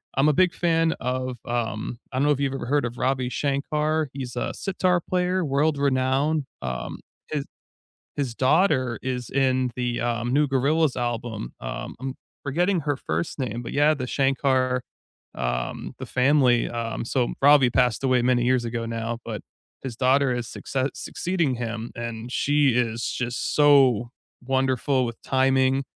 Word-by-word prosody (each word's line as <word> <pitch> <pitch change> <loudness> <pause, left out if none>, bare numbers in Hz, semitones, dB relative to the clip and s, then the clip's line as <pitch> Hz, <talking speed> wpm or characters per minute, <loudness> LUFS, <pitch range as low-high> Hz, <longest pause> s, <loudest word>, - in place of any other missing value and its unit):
I'm 135 +3 +4
a - - +3
big 180 +3 +3
fan 165 -1 +2
of, 125 0 -2
um 120 -1 -3
I 130 - 0
don't - - +2
know 145 - +4
if 140 - +1
you've 140 -1 0
ever 135 - -4
heard 145 0 +2
of 120 0 -5
Ravi 130 0 0
Shankar. 150 +3 0
He's 130 -3 -6
a - - -2
sitar 185 -2 0
player, 180 +1 0
world-renowned, 140 0 +1 0.2
um, 65 -1 -4 0.3
his 150 -2 -2 0.7
his 135 -5 -1
daughter 130 - +2
is 125 -1 -3
in 130 -2 +1
the, 120 -1 -1
uh, 120 0 -1
new 140 +5 +2
Gorillaz 140 +3 +2
album. 120 - -3
Um, - - -5
I'm 135 +1 -4 0.3
forgetting 175 +6 +1
her 145 -1 -1
first 155 - -3
name, 120 -3 -3
but, 120 - -7
yeah, 145 +2 +4
the 130 -4 -4
Shankar, 130 -2 +1 0.5
um, - - -3
the - - -5
family, 125 -2 +3
um 115 -1 -3
So 125 0 0
Ravi 140 -2 +6
passed 125 -1 +2
away 130 -2 +3
many 120 -1 +2
years 125 -1 +2
ago 115 0 -3
now, 115 0 -3
but - - -5 0.4
his 130 -3 -5
daughter 130 +1 +3
is 120 -1 -3
succe 135 +3 -2
succeeding 170 -7 -1
him, 115 -1 -4
and 115 0 -5
she 145 +1 +3
is 115 -1 0
just 120 -1 -2
so 135 -6 +5 0.4
wonderful 130 0 +1
with 115 -1 -6
timing 130 0 +2
130 Hz, 160 wpm, -25 LUFS, 120-145 Hz, 0.7 s, Ravi